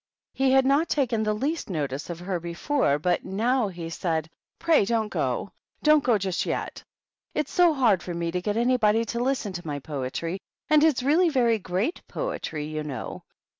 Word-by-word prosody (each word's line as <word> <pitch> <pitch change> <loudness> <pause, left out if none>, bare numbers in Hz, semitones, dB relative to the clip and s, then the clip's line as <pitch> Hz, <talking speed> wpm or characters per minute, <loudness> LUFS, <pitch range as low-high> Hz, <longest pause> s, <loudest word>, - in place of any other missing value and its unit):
He 265 0 +2
had 265 0 +5
not 280 +5 +3
taken 245 -6 +1
the 215 -1 0
least 290 +7 -2
notice 145 -3 -3
of 170 0 -6
her 180 -1 -2
before, 170 - 0
but 175 +3 0
now 230 +5 +1
he 175 -3 -6
said, 160 -1 -2
" - - -65
Pray 330 -8 +4
donH 220 0 0
go, - - -1 0.2
— - - -36
don't 305 -1 +5
go 240 -3 +3
just 190 -2 -1
yet; - - -4 0.5
it's 300 -2 -1
so 350 -2 +5
hard 240 - +3
for 175 - -5
me 170 0 -2
to 180 +1 -2
get 210 +3 -1
anybody 230 -2 +3
to 235 +2 -3
listen 250 -6 -1
to 175 -2 -7
my 145 -1 -2
poetry, 145 +5 -4 0.3
and 305 -1 +6
it's 295 -6 +3
really 325 +6 +4
very 240 -6 +2
great 190 - -2
poetry, 165 - -4
you 155 0 -4
know. 140 -5 -6
210 Hz, 195 wpm, -26 LUFS, 170-265 Hz, 0.5 s, and